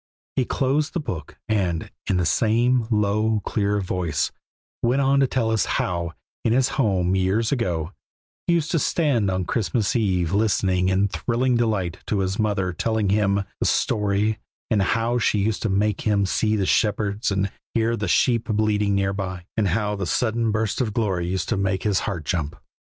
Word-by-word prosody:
He 130 - +1
closed 140 +5 0
the 175 - -1
book, 90 - -6
and 90 -7 -1 0.2
in 95 - +1
the 90 - +1
same 115 +5 +2
low, 105 0 +1
clear 105 +1 0
voice 90 -5 -1 0.5
went 120 +3 +2
on 140 0 +3
to 135 - +4
tell 115 -3 0
us 110 -4 +2
how, 85 -2 -2 0.3
in 115 - +2
his 130 +1 +3
home 95 -7 +1
years 95 +5 +1
ago, 90 - -1 0.5
he 175 - +3
used 165 -1 0
to 165 - +2
stand 135 - +1
on 95 -1 -1
Christmas 110 +1 0
eve 95 -7 +1
listening 95 -3 +2
in 95 +2 +2
thrilling 120 +5 0
delight 105 -7 0
to 100 -2 0
his 95 +2 -2
mother 100 -4 0
telling 110 +3 0
him 100 0 +2 0.2
the - - +1
story, 105 +1 +1 0.3
and 105 -3 +3
how 115 +5 +1
she 110 - +2
used 105 +1 0
to 115 - 0
make 100 +1 +1
him 100 -2 +2
see 105 +3 +1
the 100 -3 0
shepherds 105 +1 +1
and 100 -1 0 0.2
hear 115 0 +2
the 105 -2 -3
sheep 115 +5 +2
bleating 105 -2 +1
near 100 0 +1
by, 95 -2 -5
and 110 -3 +1
how 105 +3 0
the 100 -3 -3
sudden 115 +3 0
burst 110 +2 -1
of 110 -5 -2
glory 95 -7 0
used 95 +1 -2
to - - 0
make 95 -1 0
his 105 -3 +2
heart 90 -7 -4
jump. 80 -3 -2
105 Hz, 185 wpm, -23 LUFS, 95-115 Hz, 0.5 s, to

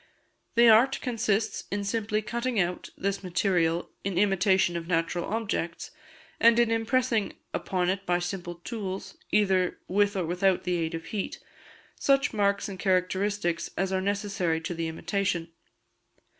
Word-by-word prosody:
The 235 0 +7
art 230 +5 +6
consists 220 -3 -1
in 205 0 -2
simply 215 +1 -1
cutting 235 +2 -1
out 180 -1 -1
this 200 0 -1
material 175 -2 0
in 195 -2 -2
imitation 190 -2 +3
of 165 -1 -4
natural 170 0 0
objects, 205 - -3 0.5
and 230 0 +6
in 235 -1 +3
impressing 225 -1 +1 0.2
upon 180 -2 -1
it 190 +1 0
by 175 0 +3
simple 175 0 -4
tools, 190 0 -6 0.2
either 190 -3 +2
with 205 +2 +2
or 185 -3 0
without 180 +2 +1
the 180 - -1
aid 165 0 -2
of 165 0 -6
heat, 200 +2 -4 0.6
such 275 -1 +3
marks 200 -2 +1
and 195 -2 -7
characteristics 185 -1 0
as 190 +1 0
are 190 - +1
necessary 200 -4 -1
to 165 +2 -4
the 165 -1 -2
imitation. 175 +1 -2
195 Hz, 145 wpm, -27 LUFS, 175-210 Hz, 0.6 s, The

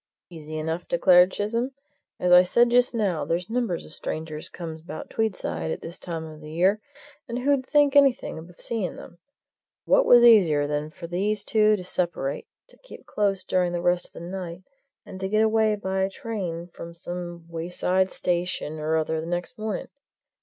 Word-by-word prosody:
"Easy 155 -2 -7
enough," 160 +3 -3
declared 180 +1 +5
Chisholm. 230 +7 -2 0.5
"As 180 - +1
I 180 0 +9
said 235 +6 +3
just 245 0 +3
now, 195 -8 0
there's 175 +4 -2
numbers 230 -8 -1
of 155 - -11
strangers 155 -1 -5
comes 160 -2 -7
about 155 -1 -8
Tweedside 85 - -2
at - - -4
this 170 - -4
time 165 -3 -5
of 155 -1 -11
the 150 - -10
year, 190 +6 +2 0.5
and 235 - -3
who'd 270 +1 +1
think 290 -1 +3
anything 275 - +3
of 170 +2 -14
seeing 220 -6 -2
them? 175 - -12 0.7
What - - +4
was 240 -1 +8
easier 180 -11 +6
than 150 +1 -2
for 170 +2 -10
these 200 +5 0
two 215 -1 +4
to 185 - -6
separate, 170 -6 -1 0.2
to - - -17
keep - - -13
close 200 -2 0
during 180 -1 0
the 175 - -2
rest 175 0 +1
of - - -27
the - - -10
night, 175 0 -6 0.4
and 190 - -9
to 190 0 -3
get 215 +2 +3
away 220 -1 +3
by 190 -1 -1
train 185 -5 -5
from 170 -1 -10
some 175 -1 -6
wayside 180 +3 -1
station 175 -4 -1
or 155 +1 0
other 160 0 -1
next 175 +7 -4
morning? 215 -3 -3
180 Hz, 180 wpm, -25 LUFS, 165-215 Hz, 0.7 s, I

